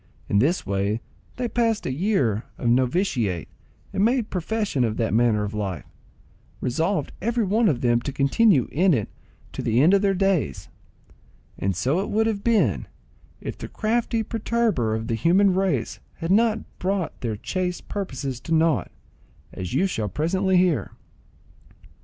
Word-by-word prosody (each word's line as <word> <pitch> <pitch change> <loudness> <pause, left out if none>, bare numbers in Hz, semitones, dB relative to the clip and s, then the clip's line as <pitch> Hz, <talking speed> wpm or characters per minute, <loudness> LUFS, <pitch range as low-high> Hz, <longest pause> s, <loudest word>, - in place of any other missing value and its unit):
In 100 - +2
this 160 - +1
way 100 +2 0 0.4
they 250 -1 -2
passed 230 -2 0
a - - -1
year 135 - 0
of 120 - -3
novitiate, 120 - +1 0.5
and 195 - +1
made 235 0 +1
profession 195 - -1
of 110 -2 -1
that 115 -2 0
manner 110 -2 +3
of 105 +1 -4
life, 95 -7 -3 0.7
resolved 165 +10 -1
every 235 +3 0
one 215 +3 +3
of 130 -6 -1
them 120 -1 +2
to 140 - -4
continue 140 - +3
in 175 +2 +3
it 110 -5 -2 0.4
to - - -4
the 115 +1 +1
end 160 +8 +5
of 200 - +4
their 195 -1 +2
days; 185 - 0 0.9
and 95 -1 0
so 130 - +1
it 195 - -2
would 220 +1 +2
have 210 -3 -1
been, 165 - +2 0.5
if - - -6
the - - -6
crafty 225 +1 0
perturber 220 - 0
of 110 0 -3
the 115 - -2
human 180 - +3
race 180 -11 0 0.2
had 165 +1 -3
not 225 +2 +1
brought 190 -3 -2
their 115 -3 -2
chaste 180 - -3
purposes 135 - -4
to 165 +4 -1
nought, 160 -3 +2 0.6
as 90 -2 -5
you 190 - +3
shall 110 - -2
presently 185 - +1
hear. 180 -4 +1
165 Hz, 160 wpm, -24 LUFS, -, 0.9 s, end